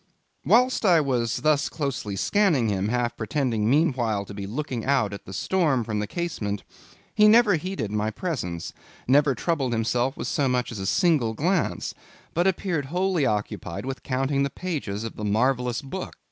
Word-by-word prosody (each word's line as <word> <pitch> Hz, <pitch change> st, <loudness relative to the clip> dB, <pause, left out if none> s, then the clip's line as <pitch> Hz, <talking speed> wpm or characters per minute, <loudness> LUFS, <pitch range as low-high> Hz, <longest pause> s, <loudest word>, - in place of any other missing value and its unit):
Whilst 250 Hz, +2 st, +3 dB
I 180 Hz, -5 st, +5 dB
was 125 Hz, -6 st, 0 dB
thus 155 Hz, -2 st, +2 dB
closely 135 Hz, -9 st, -3 dB
scanning 160 Hz, -, +2 dB
him, 100 Hz, 0 st, 0 dB
half 120 Hz, +1 st, 0 dB
pretending 115 Hz, -2 st, -1 dB
meanwhile 125 Hz, -8 st, +1 dB
to 100 Hz, -, -9 dB
be 100 Hz, -1 st, -6 dB
looking 125 Hz, 0 st, -4 dB
out 130 Hz, -7 st, +1 dB
at 100 Hz, -, -8 dB
the -, -, -9 dB
storm 145 Hz, -, +1 dB
from 105 Hz, -1 st, -2 dB
the 105 Hz, -, -2 dB
casement, 105 Hz, -10 st, -3 dB, 0.5 s
he 210 Hz, -, +6 dB
never 220 Hz, -1 st, +6 dB
heeded 160 Hz, -, -2 dB
my 105 Hz, 0 st, 0 dB
presence, 105 Hz, -, -4 dB, 0.3 s
never 140 Hz, +1 st, +4 dB
troubled 135 Hz, -3 st, -1 dB
himself 120 Hz, +4 st, 0 dB
with -, -, -4 dB
so 140 Hz, -3 st, +1 dB
much 125 Hz, -1 st, 0 dB
as 110 Hz, -, -6 dB
a 95 Hz, -, -3 dB
single 155 Hz, -, +2 dB
glance; 175 Hz, -, 0 dB, 0.4 s
but 175 Hz, +3 st, +2 dB
appeared 175 Hz, -5 st, 0 dB
wholly 180 Hz, 0 st, +1 dB
occupied 105 Hz, -3 st, -3 dB
with 135 Hz, 0 st, -5 dB
counting 135 Hz, +1 st, 0 dB
the 140 Hz, -, +1 dB
pages 140 Hz, -, -4 dB
of 115 Hz, -, -6 dB
the 105 Hz, -, -5 dB
marvellous 125 Hz, +4 st, +1 dB
book. 180 Hz, +7 st, -6 dB
130 Hz, 175 wpm, -25 LUFS, 110-160 Hz, 0.5 s, he